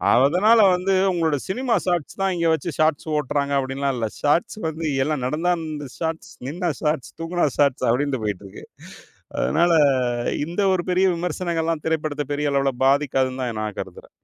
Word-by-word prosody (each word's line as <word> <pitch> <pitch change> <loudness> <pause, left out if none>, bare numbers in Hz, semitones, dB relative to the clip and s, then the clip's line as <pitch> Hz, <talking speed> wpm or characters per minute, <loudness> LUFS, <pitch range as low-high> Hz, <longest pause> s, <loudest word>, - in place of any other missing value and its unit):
அதனால 180 - +5 0.2
வந்து 185 +2 0 0.2
உங்களோட 160 -4 +1
சினிமா 245 +4 -1
ஷார்ட்ஷ் 175 -1 -2
தான் 195 -1 +1
இங்க 170 -1 0
வச்சு 160 +2 -2
ஷார்ட்ஷ் 155 0 +1
ஓட்டுறாங்க 140 0 -1
அப்டின்லாம் 135 0 -2
இல்ல. 115 -2 -1
ஷார்ட்ஷ் 150 +7 +1
வந்து 160 +1 -4 0.2
எல்லாம் 150 -2 -2
நடந்தா 160 +6 0
அந்த 155 -3 -6
ஷார்ட்ஷ், 160 -1 -4 0.2
நின்னா 175 +5 -2
ஷார்ட்ஷ், 150 -4 -1
தூங்குனா 170 0 0
ஷார்ட்ஷ் 135 -3 +2
அப்டின்டு 135 0 0
போயிட்டுருக்கு. 100 -2 -5 0.7
அதனால 170 - +2 0.7
இந்த 175 +5 -3
ஒரு 185 - +1
பெரிய 185 +1 +3
விமர்சனங்கள்லாம் 165 -2 -2
திரைப்படத்தை 155 -2 -1
பெரிய 145 0 -1
அளவுல 135 -1 +1
பாதிக்காதுன்னு 135 -2 +1
தான் 120 -3 -3
நான் 105 -2 -4
கருதுறேன். - - -8
150 Hz, 150 wpm, -22 LUFS, 135-170 Hz, 0.7 s, அதனால